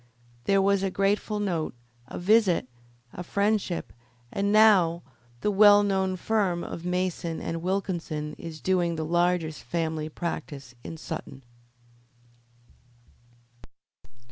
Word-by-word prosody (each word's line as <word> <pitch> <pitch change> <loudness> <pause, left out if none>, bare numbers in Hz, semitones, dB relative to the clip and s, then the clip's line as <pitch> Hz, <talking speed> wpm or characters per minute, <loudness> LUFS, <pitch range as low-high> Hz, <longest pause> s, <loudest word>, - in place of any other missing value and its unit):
There 195 -1 +3
was 200 0 +3
a 195 - 0
grateful 205 +2 0
note, 170 -10 -2 0.3
a - - -7
visit, 190 - +3 0.5
a - - -6
friendship, 200 -1 -1 0.4
and 200 +1 0
now 195 -6 +5 0.4
the 210 - +1
well 205 0 +7
known 190 -2 0
firm 185 -3 0
of 170 - -7
Mason 180 -2 -2
and 165 0 -4
Wilkinson 170 -5 -2
is 160 -2 -8
doing 175 -3 +1
the 160 -1 -3
largest 175 -1 0
family 160 -2 -2
practice 145 -5 -5
in 165 - -7
Sutton. 155 -4 -7
180 Hz, 115 wpm, -27 LUFS, 165-200 Hz, 0.5 s, well